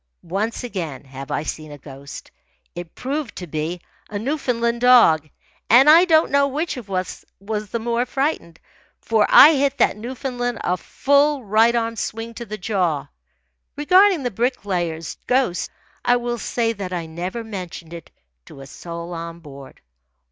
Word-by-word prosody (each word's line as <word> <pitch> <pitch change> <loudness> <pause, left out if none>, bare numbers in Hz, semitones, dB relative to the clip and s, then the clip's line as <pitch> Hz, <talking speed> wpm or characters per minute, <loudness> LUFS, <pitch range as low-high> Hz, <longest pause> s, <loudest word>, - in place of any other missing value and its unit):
Once 200 +8 -3
again 170 - -5
have 135 0 -9
I 150 - -2
seen 155 -1 -6
a 145 - -9
ghost. 140 0 -11 0.4
It 175 -1 -9
proved 275 -2 -4
to 180 - -6
be 160 +2 -4 0.3
a 210 - -4
Newfoundland 235 -2 -1
dog, 225 -12 +5 0.4
and 250 +5 +7
I 330 +4 +8
don't 320 -2 +3
know 280 0 +3
which 300 +4 -3
of 235 -6 -9
us 185 -1 -4 0.2
was 210 +1 -4
the 235 - -2
more 235 +2 -1
frightened, 270 - -2 0.4
for 220 -2 +1
I 310 - +9
hit 280 -1 +1
that 235 - +2
Newfoundland 245 0 -4
a 180 - +1
full 285 - +1
right 220 +3 +3
arm 230 -1 -1
swing 225 +2 -4
to 235 0 -8
the 215 - -6
jaw. 180 -7 -1 0.7
Regarding 365 +2 +4
the 245 - -2
Bricklayer's 185 - -2
ghost, 250 -8 +1 0.3
I 245 - +4
will 240 -1 -2
say 230 0 -1
that 195 -4 -6
I 175 -2 -3
never 180 +8 -5
mentioned 180 -6 -8
it 170 -1 -10 0.4
to 135 - -13
a - - -9
soul 170 +4 -8
on 165 0 -6
board. 140 -4 -13
220 Hz, 160 wpm, -21 LUFS, 170-250 Hz, 0.7 s, I